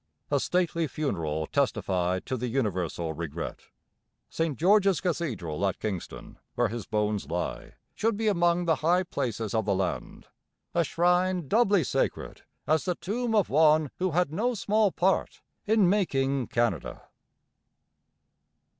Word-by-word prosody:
A - - +3
stately 170 -2 0
funeral 80 - -2
testified 95 - 0
to 130 - -2
the 125 0 -3
universal 90 - -2
regret. 80 0 -6 0.6
St 160 -5 -1
George's 195 +1 +4
Cathedral 120 - -2
at 95 - -2
Kingston, 100 -5 -6 0.2
where 120 -2 +2
his 115 -2 -6
bones 105 -7 -1
lie, 90 +2 -4 0.2
should 225 -1 0
be 220 0 -1
among 175 -3 +2
the 160 -2 +2
high 175 +4 +2
places 115 - -3
of 110 -3 +1
the 100 - +1
land, 95 -1 -3 0.5
a 170 - +3
shrine 180 +2 +1
doubly 205 - +3
sacred, - - -2 0.2
as 155 +1 +1
the 180 -2 0
tomb 225 +5 -2
of 205 -4 +2
one 155 0 +4
who 185 +1 +1
had 170 -2 0
no 235 +7 0
small 210 0 +2
part 190 +2 0 0.2
in 215 -3 +4
making 140 - +1
Canada. 115 - -1
150 Hz, 135 wpm, -27 LUFS, -, 0.6 s, George's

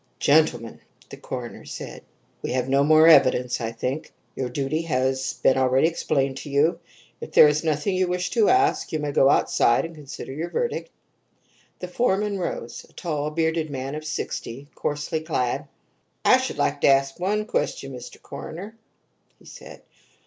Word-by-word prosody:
"Gentlemen," 140 -6 +2 0.3
the - - -8
coroner - - -7
said, - - -8 0.4
"we - - -3
have 130 0 -1
no 135 +1 +3
more 155 +2 +6
evidence, 125 -6 +4
I 115 0 -2
think. 130 +7 -4 0.2
Your 130 -2 -3
duty 140 +5 -2
has 130 -4 -1
been 130 - +2
already 130 +3 +3
explained 135 -5 -1
to 145 - -8
you; 150 +5 +2 0.4
if - - -9
there - - +8
is 150 +1 +1
nothing 155 +4 0
you 185 0 +1
wish 180 0 -2
to 225 -3 +3
ask 390 0 +2
you 155 - 0
may 150 -1 -3
go 135 -1 +4
outside 120 -2 +3
and 165 - -8
consider 145 -4 -9
your 165 +5 -4
verdict." 480 - -2 0.9
The 180 - -4
foreman 200 0 0
rose 120 -9 -5
a - - -25
tall, 150 -3 -3
bearded 160 0 -1
man 135 0 -5
of 155 +1 -5
sixty, 140 -3 -5
coarsely 150 +2 -3
clad. 150 -3 -2 0.6
"I - - +7
should - - -4
like - - 0
to - - +4
ask 135 +2 +3
one 210 +4 0
question, 135 -10 -2
Mr. 125 -1 -10
Coroner," 200 +7 -9 0.6
he - - -22
said. - - -12
150 Hz, 170 wpm, -24 LUFS, 135-165 Hz, 0.9 s, there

